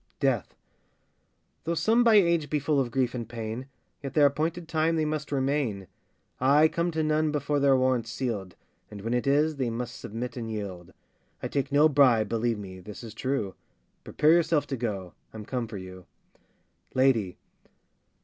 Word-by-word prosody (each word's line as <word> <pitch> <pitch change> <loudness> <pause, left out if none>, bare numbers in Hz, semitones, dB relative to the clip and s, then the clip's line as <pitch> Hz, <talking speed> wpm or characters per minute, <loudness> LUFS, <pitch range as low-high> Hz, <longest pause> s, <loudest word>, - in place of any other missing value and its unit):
DEATH. 135 -7 0 1.1
Though 170 +2 -1
some 225 +7 +3
by 230 -2 +5
age 170 -7 +3
be 150 - +1
full 145 0 +1
of 130 -3 0
grief 125 0 0
and 120 -3 -5
pain, 115 +2 -5 0.3
Yet 135 -2 -6
their 150 -2 +6
appointed 160 +4 0
time 160 0 +1
they 155 -1 +1
must 150 0 -3
remain: 135 -8 -1 0.5
I 145 +4 +5
come 170 +2 -1
to 160 0 0
none 155 0 +1
before 145 0 0
their 140 -1 +4
warrant's 130 -3 +1
sealed, 110 -7 -4 0.3
And 105 -1 -9
when 115 +3 -2
it 125 +2 0
is, 150 +2 +2
they 130 -3 0
must 120 +1 -5
submit 115 +4 -5
and 115 -2 -4
yield. 100 -5 -6 0.5
I - - 0
take 140 0 -2
no 145 +2 +6
bribe, 130 -8 +4
believe 115 0 0
me, 95 -2 -8
this 105 +5 -10
is 110 -3 -8
true; 130 -8 -2 0.5
Prepare 150 +1 +2
yourself 165 -3 +3
to 135 - -1
go; 100 -7 -4 0.2
I'm 105 -1 -7
come 125 0 -3
for 110 -2 -7
you. 95 -1 -10 0.9
LADY. 120 -9 +2
130 Hz, 175 wpm, -27 LUFS, 115-150 Hz, 1.1 s, their